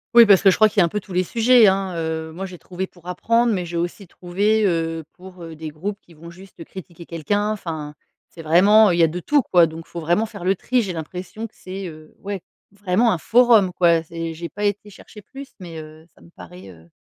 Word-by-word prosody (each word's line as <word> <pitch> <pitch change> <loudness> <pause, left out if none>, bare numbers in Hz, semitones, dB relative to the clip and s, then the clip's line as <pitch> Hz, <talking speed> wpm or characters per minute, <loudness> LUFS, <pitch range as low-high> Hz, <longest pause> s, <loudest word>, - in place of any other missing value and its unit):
Oui 235 -1 +10
parce 200 -3 +5
que 195 - +6
je - - +3
crois 215 0 +5
qu'il 210 - -1
y - - +7
a - - +5
un - - 0
peu 210 +5 -4
tous 190 - -16
les 185 +1 0
sujets, 235 +2 +5
hein. 190 -1 0
Heu, 160 -1 -4
moi 185 +4 -6
j'ai 185 -2 -10
trouvé 185 +2 -6
pour 175 -2 -23
apprendre 230 +6 +1
mais 180 -3 -2
j'ai 170 0 -7
aussi 175 +3 -4
trouvé, 205 +6 0
heu, 165 -3 -1
pour, 180 -1 -13
heu, 165 -1 -9
des 160 0 -7
groupes 190 +7 -6
qui 170 - -21
vont 165 +2 -13
juste 185 -1 -13
critiquer 170 -1 -12
quelqu'un, 205 +6 -2
enfin 160 -7 -6 0.3
c'est 165 - -12
vraiment 200 +6 +5
il 170 - 0
y - - +6
a - - +5
de 175 +3 -5
tout 290 - +2
quoi. 175 -7 +4
Donc 160 +1 -10
faut 170 - -7
vraiment 175 +7 +1
faire 205 -5 -9
le 190 +1 +2
tri, 250 +6 0
j'ai 195 -5 -4
l'impression 180 +7 -7
que 220 - -35
c'est, 190 0 -7
heu, 155 -1 -13
ouais, 200 -1 -5 0.3
vraiment 205 +3 +1
un - - 0
forum 220 -2 +4
quoi, 170 -2 +3
c'est 165 0 -6
j'ai 170 +1 -6
pas 205 +4 -7
été 205 0 -2
chercher 210 +2 -14
plus, 275 +6 -11
mais, 170 -3 -9
heu, 155 +1 -14
ça - - -23
me - - -18
paraît, 180 - -13
heu. 85 -2 -17
180 Hz, 250 wpm, -21 LUFS, 165-205 Hz, 0.3 s, Oui